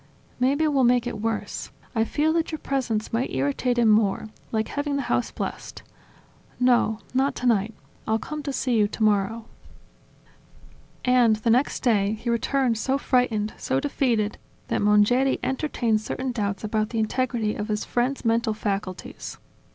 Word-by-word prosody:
"Maybe 280 Hz, +5 st, +2 dB
we'll 280 Hz, -3 st, +2 dB
make 245 Hz, 0 st, +4 dB
it 220 Hz, -4 st, -4 dB
worse: 225 Hz, 0 st, -3 dB, 0.2 s
I 225 Hz, -2 st, +2 dB
fear 310 Hz, +6 st, +1 dB
that 330 Hz, 0 st, 0 dB
your 315 Hz, -, -3 dB
presence 245 Hz, -8 st, -2 dB
might 235 Hz, +3 st, 0 dB
irritate 145 Hz, -, 0 dB
him 235 Hz, -2 st, +4 dB
more, 215 Hz, 0 st, +2 dB, 0.2 s
like 220 Hz, -1 st, -1 dB
having 285 Hz, 0 st, -2 dB
the 280 Hz, -, -1 dB
house -, -, 0 dB
blessed. -, -, -6 dB, 0.8 s
No, 245 Hz, -3 st, +3 dB, 0.2 s
not 270 Hz, +2 st, +1 dB
tonight. 225 Hz, -3 st, +1 dB, 0.3 s
I'll 220 Hz, 0 st, +2 dB
come 305 Hz, +6 st, -6 dB
to 280 Hz, -1 st, -3 dB
see 260 Hz, -2 st, 0 dB
you 210 Hz, -2 st, +4 dB
tomorrow.. 215 Hz, +1 st, 0 dB, 0.8 s
." -, -, -29 dB, 0.7 s
And, 250 Hz, -3 st, +5 dB
the 215 Hz, +2 st, 0 dB
next 255 Hz, +5 st, +1 dB
day, 210 Hz, -4 st, +2 dB
he 225 Hz, +2 st, -3 dB
returned 235 Hz, 0 st, +1 dB
so 265 Hz, +4 st, +1 dB
frightened, 235 Hz, -6 st, +1 dB
so 260 Hz, +1 st, 0 dB
defeated 245 Hz, -7 st, 0 dB, 0.3 s
than -, -, 0 dB
Mongeri 210 Hz, +6 st, +4 dB
entertained 245 Hz, -6 st, 0 dB
certain 255 Hz, +4 st, -3 dB
doubts 205 Hz, -4 st, -2 dB
about 215 Hz, 0 st, 0 dB
the 230 Hz, -, -4 dB
integrity 225 Hz, -1 st, 0 dB
of 210 Hz, -, -4 dB
his 210 Hz, -1 st, -2 dB
friend's 250 Hz, +2 st, -1 dB
mental 225 Hz, -1 st, +1 dB
faculties. 200 Hz, -3 st, -4 dB
230 Hz, 160 wpm, -25 LUFS, 215-260 Hz, 0.8 s, And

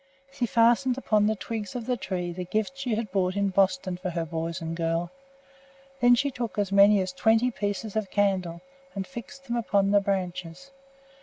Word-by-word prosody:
She 265 Hz, -3 st, -2 dB
fastened 240 Hz, +3 st, +3 dB
upon 210 Hz, -5 st, +2 dB
the 220 Hz, -, +1 dB
twigs 210 Hz, +1 st, -5 dB
of 240 Hz, -2 st, -4 dB
the 250 Hz, -, 0 dB
tree 185 Hz, -5 st, -3 dB
the 180 Hz, +1 st, -5 dB
gifts 215 Hz, +9 st, -2 dB
she 250 Hz, -5 st, -1 dB
had 220 Hz, -3 st, -3 dB
bought 185 Hz, -1 st, 0 dB
in 200 Hz, 0 st, +1 dB
Boston 185 Hz, -1 st, +1 dB
for 185 Hz, +1 st, -4 dB
her 170 Hz, -1 st, -2 dB
boys 165 Hz, +1 st, -4 dB
and 165 Hz, 0 st, -4 dB
girl. 165 Hz, +1 st, -1 dB, 0.9 s
Then 245 Hz, -1 st, +6 dB
she 280 Hz, +3 st, 0 dB
took 240 Hz, -4 st, -5 dB
as 200 Hz, -2 st, 0 dB
many 200 Hz, +1 st, +6 dB
as 185 Hz, -1 st, -3 dB
twenty 225 Hz, +6 st, +3 dB
pieces 205 Hz, 0 st, -3 dB
of 215 Hz, -3 st, -1 dB
candle 185 Hz, -4 st, 0 dB, 0.3 s
and 195 Hz, -1 st, -3 dB
fixed 255 Hz, +6 st, -10 dB
them 240 Hz, -2 st, -3 dB
upon 200 Hz, -3 st, +1 dB
the 205 Hz, 0 st, +5 dB
branches. 185 Hz, +4 st, -3 dB
200 Hz, 190 wpm, -27 LUFS, 185-230 Hz, 0.9 s, Then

